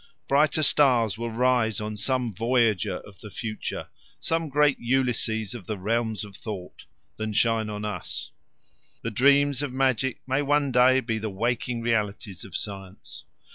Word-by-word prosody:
Brighter 150 +2 +3
stars 125 -8 +4
will 115 +1 -4
rise 120 -2 +2
on 105 0 -4
some 125 +1 0
voyager 115 -2 +1
of 100 -3 -15
the 105 - -10
future 110 +1 -5 0.3
some 165 -1 0
great 145 -1 +3
Ulysses 120 -4 0
of 115 -7 -9
the 110 - -3
realms 110 +2 -1
of 100 -2 -13
thought 100 -5 -8 0.3
than 110 0 -3
shine 115 0 +2
on 105 0 -4
us. 105 - -4 0.7
The 115 - -2
dreams 140 +3 +4
of 145 -3 -3
magic 130 -1 +1
may 135 +2 +1
one 145 -1 +2
day 130 +1 +5
be 115 -3 -2
the 110 0 -3
waking 115 +3 -2
realities 105 -4 -1
of 95 - -5
science. 95 -2 -7
115 Hz, 155 wpm, -26 LUFS, 105-130 Hz, 0.7 s, day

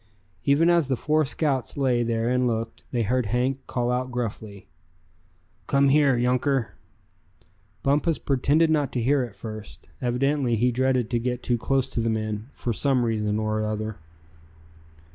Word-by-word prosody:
Even 145 +4 +4
as 170 -4 +3
the 135 - +1
four 155 +5 +1
scouts 140 -3 -1
lay 130 -3 +2
there 115 -1 0
and 125 0 +2
looked, 115 -1 -3
they 120 -2 0
heard 125 +2 0
Hank 125 +5 0
call 120 -1 -1
out 125 +1 -1
gruffly: 110 -4 -5 1.0
"Come 140 0 +3
here, 140 -2 +4
younker!" 125 +1 +1 1.1
Bumpus 150 +4 +2
pretended 145 +4 +2
not 145 -4 +1
to 125 - -1
hear 135 +4 +2
at 120 -5 -5
first. 110 +1 -9
Evidently 125 0 +1
he 125 +3 +2
dreaded 130 -1 +1
to 120 - +1
get 125 +1 -3
too 120 -1 0
close 135 +2 +1
to - - -2
the 115 0 0
men, 110 +1 -3
for 120 - -3
some 130 +1 +1
reason 105 -2 0
or 110 0 -1
other. 110 0 -3
125 Hz, 160 wpm, -25 LUFS, 115-135 Hz, 1.1 s, Even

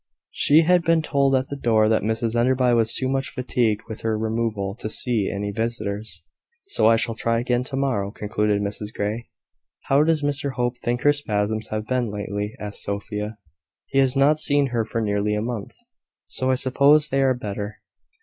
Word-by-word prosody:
She 150 +3 +4
had 175 +2 +4
been 165 -1 +2
told 140 -3 +2
at 130 0 0
the 140 - -4
door 110 -5 +2
that 110 0 +2
Mrs 110 +1 -1
Enderby 125 +1 +3
was 115 -1 +2
too 130 - 0
much 135 0 -1
fatigued 120 -4 -1
with 110 - -7
her 110 -1 0
removal 110 -3 -2
to 110 - -4
see 110 -3 0
any 100 0 -3
visitors. 110 -1 -3 0.4
"So 390 - +1
I 115 - +6
shall 115 0 0
try 115 +1 0
again 120 +1 0
to 135 - -5
morrow," 130 -8 0
concluded 105 0 -1
Mrs 105 +1 -4
Grey. 110 +3 -3 0.5
"How 140 +1 +3
does 155 -1 +2
Mr 145 -1 -1
Hope 125 0 -2
think 120 0 -2
her 145 - +5
spasms 110 -5 -2
have 110 0 -3
been 125 -1 -1
lately?" 105 +1 -4
asked 105 -1 -3
Sophia. 105 +1 -3 0.5
"He 135 - 0
has 135 -1 +3
not 140 +3 +4
seen 145 -2 +2
her 115 -2 -1
for 115 +1 -3
nearly 105 0 0
a - - 0
month; 115 -4 -5 0.5
so 130 - -2
I 130 - +3
suppose 140 +4 +3
they 135 +1 +1
are 130 -1 +3
better." 105 -2 -5
115 Hz, 190 wpm, -23 LUFS, 105-135 Hz, 0.5 s, I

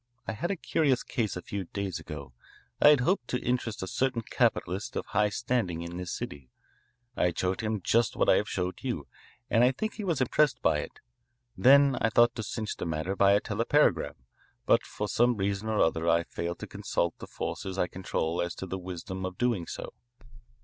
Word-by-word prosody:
I - - 0
had 140 +11 -3
a 200 - 0
curious 145 -6 +1
case 110 -6 -2
a 90 - -7
few 100 -2 -4
days 95 0 -4
ago. 70 -5 -8 0.5
I - - +8
had 150 -3 +7
hoped 175 -1 +1
to 125 - -1
interest 120 -5 -2
a - - -4
certain 125 +1 0
capitalist 105 +3 0
of - - -2
high 105 0 +2
standing 105 -7 -1
in 85 +1 -6
this 90 -1 -4
city. 70 -3 -6 0.7
I - - +2
had 85 -2 0
showed 95 +3 0
him 110 -2 -2
just 115 -1 +2
what - - +1
I - - +6
have - - -1
showed 90 0 -2
you, - - -3 0.4
and 115 - +3
I 125 - +5
think 215 +11 -3
he 215 - -6
was 170 -7 0
impressed 135 +3 +2
by - - +3
it. - - -8 0.5
Then 140 +1 +6
I 115 - +3
thought 120 +1 +5
to 110 - -4
clinch 110 +1 -4
the - - -4
matter 80 +4 -2
by 100 0 +5
a 100 - +5
telepagram, 105 - +1 0.5
but - - +4
for 105 - -4
some 120 +2 +2
reason 100 +2 -1
or 110 - 0
other 80 +1 +2
I 85 0 +4
failed 85 +1 -4
to - - -5
consult 85 - -2
the - - -8
forces 95 -1 -5
I 90 - +2
control 90 -2 -2
as 85 -1 -3
to - - -5
the 95 +1 -4
wisdom 95 +1 -6
of 95 0 -4
doing 115 -9 0
so. - - -6
100 Hz, 210 wpm, -29 LUFS, 90-120 Hz, 0.7 s, I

